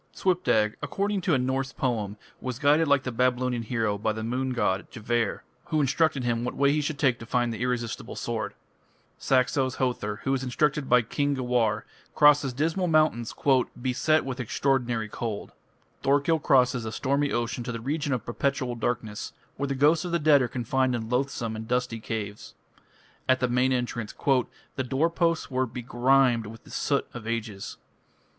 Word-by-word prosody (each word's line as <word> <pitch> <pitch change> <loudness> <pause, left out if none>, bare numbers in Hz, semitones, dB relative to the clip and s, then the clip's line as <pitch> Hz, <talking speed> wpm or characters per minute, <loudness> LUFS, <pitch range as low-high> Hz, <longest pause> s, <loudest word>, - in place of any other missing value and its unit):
Svipdag, 140 - +2
according 200 0 -1
to 170 -4 +2
a - - +3
Norse 130 +1 -1
poem, 110 -7 -2 0.2
was 130 -2 -4
guided 150 +3 +3
like 140 -2 +3
the 125 - -3
Babylonian 125 0 +1
hero 110 -3 -1
by 110 +1 0
the 110 +1 -4
moon 130 +3 -1
god, 95 -6 0
Gevar, 115 -1 -1 0.2
who 155 -2 0
instructed 145 0 +2
him 120 -1 0
what 125 - -3
way 140 0 +3
he 150 +1 +1
should 150 0 -3
take 130 -5 +2
to 115 - -8
find 120 -1 +1
the 110 - -6
irresistible 120 -2 -2
sword. - - -3 0.6
Saxo's 130 0 +1
Hother, 120 -5 -1
who 135 - +1
is 135 -1 -1
instructed 140 +2 0
by 125 -1 +5
"King 145 +5 0
Gewar", 120 -4 +1 0.3
crosses 145 -2 +5
dismal 160 +8 0
mountains 155 -8 +2 0.4
"beset 130 +5 +1
with 130 -1 -4
extraordinary 125 -2 0
cold". 110 -1 -5 0.5
Thorkill 145 +4 +2
crosses 125 -4 +3
a 110 - -4
stormy 140 +4 0
ocean 120 0 -2
to 125 - -4
the 115 - -4
region 145 +4 -2
of 125 -3 -1
perpetual 130 +1 -1
darkness, 115 -2 -3 0.2
where 140 - -1
the 140 - -2
ghosts 150 +5 +4
of 175 - -4
the 170 - +2
dead 150 -3 +5
are 125 - +1
confined 130 +1 0
in 110 -1 -4
loathsome 125 -3 -1
and 110 0 -6
dusty 125 -1 -1
caves. 105 -2 -5 0.7
At 130 0 +4
the 125 - +1
main 125 +2 +2
entrance 120 -3 -2 0.6
"the 130 - -1
door 135 +6 +1
posts 165 -3 0
were 130 0 +1
begrimed 120 0 +2
with 115 +1 -11
the - - -15
soot - - 0
of 115 -2 -8
ages". 115 -4 -4
125 Hz, 175 wpm, -27 LUFS, 115-140 Hz, 0.7 s, by